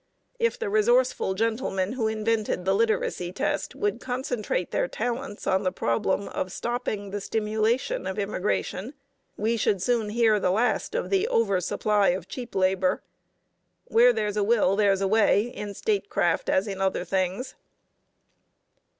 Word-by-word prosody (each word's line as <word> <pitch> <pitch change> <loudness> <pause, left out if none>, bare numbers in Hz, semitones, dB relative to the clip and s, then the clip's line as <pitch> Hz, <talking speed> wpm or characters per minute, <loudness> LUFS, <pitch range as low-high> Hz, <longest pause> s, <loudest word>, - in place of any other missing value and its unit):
If 465 +1 +1
the 460 -2 -3
resourceful 475 - +2
gentlemen 220 -3 -1
who 235 -4 0
invented 215 -3 -1
the 190 - +3
literacy 200 -4 0
test 265 +10 -2
would 415 -1 -1
concentrate 245 -8 -2
their - - 0
talents 240 +2 -4
on 190 0 +2
the 185 -2 0
problem 185 +7 0
of 185 - -3
stopping 215 -3 -3
the 205 0 -3
stimulation 220 +1 -1
of 190 - -4
immigration, 205 +4 -2 0.4
we 225 +3 0
should 200 -2 +1
soon 225 +2 0
hear 220 -1 +3
the 185 - +1
last 225 - 0
of - - -2
the 390 +2 +2
over 200 - +2
supply 205 +3 +1
of 185 +2 0
cheap 245 -3 -7
labor. 185 0 +1 0.9
Where 240 +2 +6
there's 210 -3 -2
a 205 - +2
will 205 -3 +3
there's 200 -2 +3
a 195 - +2
way, 205 -1 +4
in 210 -4 -6
statecraft 420 - 0
as 190 +3 +2
in 195 -1 -4
other 190 -1 0
things. 190 +6 -1
215 Hz, 150 wpm, -26 LUFS, 195-240 Hz, 0.9 s, Where